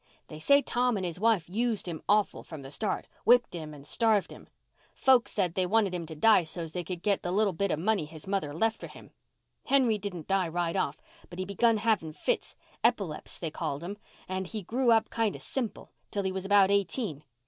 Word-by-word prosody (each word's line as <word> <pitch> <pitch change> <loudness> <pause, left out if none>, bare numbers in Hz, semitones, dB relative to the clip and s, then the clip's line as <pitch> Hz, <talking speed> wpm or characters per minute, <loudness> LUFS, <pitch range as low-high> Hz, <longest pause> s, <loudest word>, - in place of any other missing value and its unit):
They 155 - -8
say 280 - +4
Tom 245 -2 +1
and 190 - -2
his 175 0 -4
wife 215 -5 +2
used 220 +1 -1
him 165 -3 -5
awful 210 0 +2
from 155 -4 -9
the 135 - -9
start—whipped 230 - +1
him 160 -3 -6
and 145 -2 -12
starved 220 +3 +2
him. - - -12 0.5
Folks 250 -5 +4
said 185 -5 0
they 185 0 0
wanted 205 -1 +2
him 170 -2 -4
to 160 - -8
die 215 +5 +5
so's 165 0 -5
they 180 - -3
could 175 0 -6
get 200 -2 +1
the 175 - -3
little 200 0 +2
bit 200 +4 -1
of 155 - 0
money 195 0 +1
his 155 0 -11
mother 195 -5 -1
had 145 +2 -7
left 225 +3 +1
for - - -7
him. - - -14 0.5
Henry 250 -6 +3
didn't 185 -6 -6
die 195 -2 +2
right 170 0 -1
off, 145 +2 -1 0.3
but 175 - -10
he 185 - -2
begun 220 +4 +2
having 210 -8 0
fits—epileps, 230 - -2
they 165 -3 -4
called 145 +1 -4
'em—and 190 -1 -7
he 215 +1 -5
grew 245 +6 0
up 225 -1 +4
kind 225 -3 0
of - - -10
simple, 245 -5 -4 0.2
till 200 - -2
he 190 - -1
was 190 0 -4
about 200 -1 +5
eighteen. 200 - -1
195 Hz, 215 wpm, -29 LUFS, 170-220 Hz, 0.5 s, die